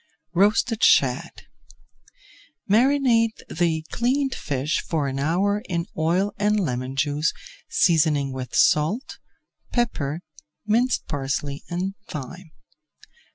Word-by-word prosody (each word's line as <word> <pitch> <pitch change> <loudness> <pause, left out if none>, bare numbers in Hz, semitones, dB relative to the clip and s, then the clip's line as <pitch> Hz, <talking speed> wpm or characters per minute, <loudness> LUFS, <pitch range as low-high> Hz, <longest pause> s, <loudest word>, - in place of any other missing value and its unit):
ROASTED 210 +4 +2
SHAD 125 -2 +3 1.2
Marinate 235 0 +3
the 160 -2 0
cleaned 265 +3 0
fish 140 +1 -2
for 155 -4 -1
an 135 0 -3
hour 190 +8 +1
in 170 -2 -1
oil 175 +6 +1
and 210 +1 +2
lemon 130 -6 -2
juice, 145 +3 +1 0.4
seasoning 150 -5 +2
with 130 -1 -6
salt, 165 - +2 0.5
pepper, 170 - -1 0.4
minced 235 +4 +1
parsley, 140 0 -3
and 185 +3 -2
thyme. 160 - -8
170 Hz, 100 wpm, -24 LUFS, 145-210 Hz, 1.2 s, SHAD